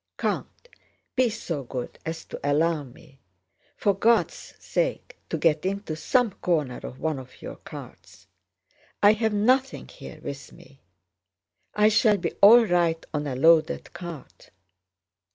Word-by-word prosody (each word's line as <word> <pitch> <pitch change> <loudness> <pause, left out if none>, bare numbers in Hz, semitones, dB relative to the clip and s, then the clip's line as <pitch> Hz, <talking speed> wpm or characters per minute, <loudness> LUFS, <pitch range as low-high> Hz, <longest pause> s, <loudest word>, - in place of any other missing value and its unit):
"Count, - - -3 0.5
be 255 -2 +3
so 170 -9 -4
good 125 0 -6
as 160 0 -5
to - - -8
allow 155 +3 +2
me... 135 +1 -17 0.6
for 200 - +2
God's 230 - +1
sake, - - -3
to - - -2
get 155 -2 +2
into 195 -4 -3
some 245 - +1
corner 150 -9 -1
of 130 - -9
one 155 -3 -2
of 130 -1 -13
your - - -8
carts! - - -12 0.8
I 205 +1 +8
have 220 0 0
nothing 255 +6 +1
here - - -11
with 140 0 -7
me.... 135 +1 -18 0.9
I 210 0 +5
shall 215 -1 +4
be 175 - -2
all 230 +4 +9
right 170 -4 +1
on 150 -1 -2
a 130 - -3
loaded 160 +3 +3
cart...." 170 -6 -10
170 Hz, 140 wpm, -25 LUFS, 145-215 Hz, 0.9 s, all